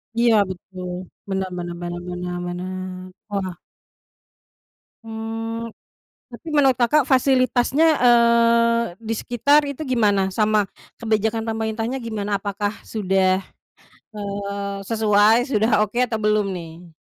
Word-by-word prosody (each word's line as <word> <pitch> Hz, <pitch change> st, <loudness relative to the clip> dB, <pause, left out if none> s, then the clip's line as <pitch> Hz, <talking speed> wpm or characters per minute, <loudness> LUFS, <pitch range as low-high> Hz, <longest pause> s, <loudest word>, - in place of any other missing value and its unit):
Iya, 235 Hz, -1 st, +4 dB
betul. 185 Hz, 0 st, -8 dB, 0.4 s
Benar 190 Hz, -1 st, -2 dB
benar 175 Hz, -1 st, -5 dB
benar 175 Hz, 0 st, -5 dB
benar 180 Hz, 0 st, -4 dB
benar. 185 Hz, +1 st, -5 dB, 0.3 s
Wah. 190 Hz, -4 st, -3 dB, 1.5 s
Mmm, 225 Hz, +1 st, -5 dB, 0.6 s
tapi 245 Hz, +7 st, -10 dB
menurut 270 Hz, -3 st, +4 dB
Kakak 255 Hz, +5 st, +4 dB
fasilitasnya, 260 Hz, +2 st, +3 dB
eee, 235 Hz, -1 st, +4 dB, 0.2 s
di 225 Hz, 0 st, -2 dB
sekitar 285 Hz, +5 st, +2 dB
itu 280 Hz, +2 st, -5 dB
gimana? 210 Hz, -8 st, +1 dB
Sama 210 Hz, 0 st, +1 dB, 0.3 s
kebijakan 220 Hz, 0 st, 0 dB
pemerintahnya 225 Hz, +3 st, -2 dB
gimana? 210 Hz, -4 st, -3 dB
Apakah 205 Hz, 0 st, -3 dB
sudah, 190 Hz, -2 st, +1 dB, 0.7 s
eee, 200 Hz, -1 st, -4 dB
sesuai, 215 Hz, -1 st, +4 dB
sudah 220 Hz, 0 st, +2 dB
oke 215 Hz, +3 st, -3 dB
atau 225 Hz, -2 st, -3 dB
belum, 210 Hz, -1 st, +2 dB
nih? 170 Hz, 0 st, -10 dB
215 Hz, 110 wpm, -22 LUFS, 195-235 Hz, 1.5 s, Iya